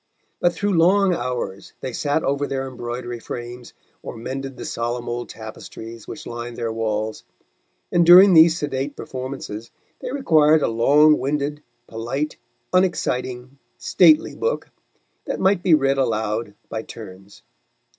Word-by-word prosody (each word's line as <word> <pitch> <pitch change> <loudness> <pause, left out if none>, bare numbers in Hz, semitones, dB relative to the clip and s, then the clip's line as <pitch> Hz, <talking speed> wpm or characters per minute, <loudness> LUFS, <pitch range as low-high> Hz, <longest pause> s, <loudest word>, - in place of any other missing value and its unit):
But 175 0 +2
through 205 +2 -1
long 185 +3 +4
hours 125 - -4
they 130 - -5
sat 145 +4 0
over 140 +1 0
their 135 -1 -3
embroidery 120 -1 -6
frames 120 +1 -8 0.3
or - - -8
mended 135 +3 -6
the - - -7
solemn 120 +1 -3
old 120 0 -4
tapestries 110 0 -10
which 150 - -8
lined 120 0 -7
their 115 -2 -2
walls, 110 -1 -2 0.7
and 175 - +4
during 180 +3 +9
these 160 0 +7
sedate 145 -1 -3
performances 130 -4 -7 0.3
they - - -5
required 160 - +4
a - - +2
long 145 +7 +4
winded, 145 +1 -2 0.2
polite, 120 +7 -4 0.4
unexciting, 130 -8 -1 0.2
stately 160 -4 +4
book 465 +2 -2 0.5
that - - -3
might 190 -1 +2
be 175 -4 +5
read 135 -2 +1
aloud 110 -3 -1
by 110 - -4
turns. 100 -3 -12
130 Hz, 135 wpm, -22 LUFS, 115-155 Hz, 0.7 s, during